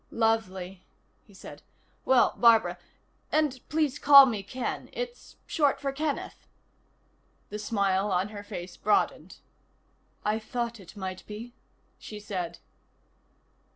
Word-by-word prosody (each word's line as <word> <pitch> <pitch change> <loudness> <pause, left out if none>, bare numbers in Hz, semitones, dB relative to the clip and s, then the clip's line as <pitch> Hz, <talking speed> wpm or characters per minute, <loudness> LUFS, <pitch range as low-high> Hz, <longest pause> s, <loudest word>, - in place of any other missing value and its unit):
"Lovely," 190 -5 -1 0.4
he - - -19
said. - - -11 0.4
"Well, 260 -2 +4
Barbara 220 -6 +4 0.5
and 300 -4 +1
please 300 -2 0
call 280 -1 +10
me 225 -6 -2
Ken. 245 +6 -5
It's - - -6
short 290 -3 +1
for 275 -1 -2
Kenneth." 295 +1 -4 1.0
The 210 - -4
smile 200 -2 0
on 185 +2 +1
her 205 -1 -8
face 180 -4 -8
broadened. 210 0 0 0.9
"I 210 +1 +1
thought 235 0 -4
it 190 +2 -14
might 185 -1 -5
be," 225 +3 -8 0.5
she 210 - -9
said. 185 -5 -4
215 Hz, 120 wpm, -28 LUFS, 195-260 Hz, 1.0 s, call